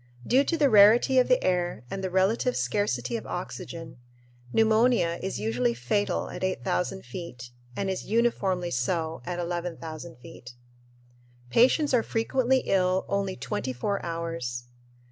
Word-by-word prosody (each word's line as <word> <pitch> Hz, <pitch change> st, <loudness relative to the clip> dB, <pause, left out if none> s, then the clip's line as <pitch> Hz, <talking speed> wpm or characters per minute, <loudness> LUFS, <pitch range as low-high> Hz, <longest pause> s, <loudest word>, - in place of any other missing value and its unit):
Due 265 Hz, +3 st, +4 dB
to 330 Hz, +3 st, -1 dB
the 295 Hz, -3 st, +4 dB
rarity 230 Hz, +4 st, +6 dB
of 250 Hz, -, +3 dB
the 255 Hz, -, +3 dB
air 175 Hz, -9 st, 0 dB
and 195 Hz, -, -4 dB
relative 190 Hz, +7 st, +1 dB
scarcity 125 Hz, -, -1 dB
of 110 Hz, -, -9 dB
oxygen, 155 Hz, +5 st, -6 dB, 0.5 s
pneumonia 220 Hz, -, +3 dB
is 190 Hz, -, -3 dB
usually 115 Hz, +2 st, 0 dB
fatal 125 Hz, -, -1 dB
at -, -, -7 dB
8000 185 Hz, 0 st, -2 dB
feet 125 Hz, -10 st, -8 dB, 0.2 s
and 195 Hz, -, -2 dB
is 190 Hz, -1 st, -3 dB
uniformly 195 Hz, -6 st, +1 dB
so 160 Hz, +6 st, -1 dB
at 180 Hz, -1 st, -3 dB
11,000 170 Hz, -3 st, -5 dB
feet. 125 Hz, 0 st, -12 dB, 1.0 s
Patients 260 Hz, -, +4 dB
are 245 Hz, -, +5 dB
frequently 255 Hz, +3 st, +1 dB
ill 185 Hz, -1 st, +1 dB
only 200 Hz, -1 st, -1 dB
twenty 130 Hz, 0 st, -3 dB
four 200 Hz, -, -2 dB
hours. 165 Hz, -8 st, -4 dB
185 Hz, 135 wpm, -27 LUFS, 160-220 Hz, 1.0 s, rarity